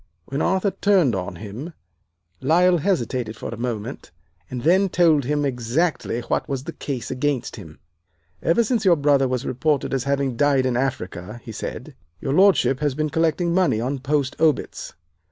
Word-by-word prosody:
"When 140 +3 -3
Arthur 190 +2 +1
turned 190 - +3
on 90 -1 -3
him 110 - -8 0.7
Lyle 175 +5 +4
hesitated 125 - -1
for - - -6
a - - -5
moment, 120 +1 -5 0.4
and 125 -1 -5
then 190 +5 +4
told 160 -6 +3
him 145 +1 0
exactly 125 +1 -1
what - - -2
was 135 -2 -2
the - - -6
case 130 -5 -5
against 130 -1 -1
him. 85 -9 -11 0.6
"'Ever 170 +8 +3
since 230 -1 0
your 185 -4 +5
brother 140 -2 +3
was 130 +1 -2
reported 140 +3 0
as 130 -2 -1
having 140 -2 0
died 140 -2 +3
in 125 -2 0
Africa,' 110 -5 -3
he 115 - -8
said, - - -6 0.3
'your 135 - -2
Lordship 185 -7 +4
has 145 -3 0
been 155 0 -1
collecting 165 +1 +1
money 180 -11 +2
on 130 +4 -2
post 140 0 -1
obits. 155 -3 0
140 Hz, 170 wpm, -22 LUFS, 125-165 Hz, 0.7 s, your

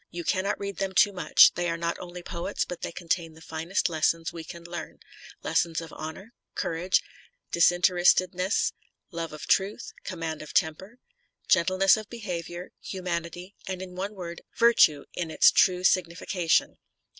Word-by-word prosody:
You 170 0 -6
cannot 195 +3 0
read 200 -1 -5
them 195 -1 -2
too 205 +1 +4
much, 180 -3 +6
they 175 0 -1
are 165 - -1
not 170 0 -2
only 180 0 -8
poets 180 +3 -3
but 180 - -7
they - - -4
contain 170 -1 -2
the - - -14
finest 165 +4 -2
lessons 165 0 0
we 165 -1 -7
can 170 +2 -10
learn, 170 0 -7 0.5
lessons 165 -2 +1
of 165 -2 -9
honour, 175 +9 -8 0.2
courage, 170 +3 0 0.5
disinterestedness, 180 +2 +3 0.4
love 165 -2 -4
of 155 - -8
truth, 200 +4 0
command 165 -4 -4
of 155 - -10
temper, 185 +9 0 0.5
gentleness 185 +3 +4
of 215 -1 -8
behaviour, 180 -6 -6
humanity, 175 0 -5
and 185 -1 -4
in 185 -1 -8
one 195 +3 -5
word, 170 -2 -7 0.2
virtue 165 -11 +5
in 170 -2 -3
its - - +6
true 180 -1 +3
signification." 175 -1 +1
175 Hz, 155 wpm, -27 LUFS, 165-190 Hz, 0.5 s, much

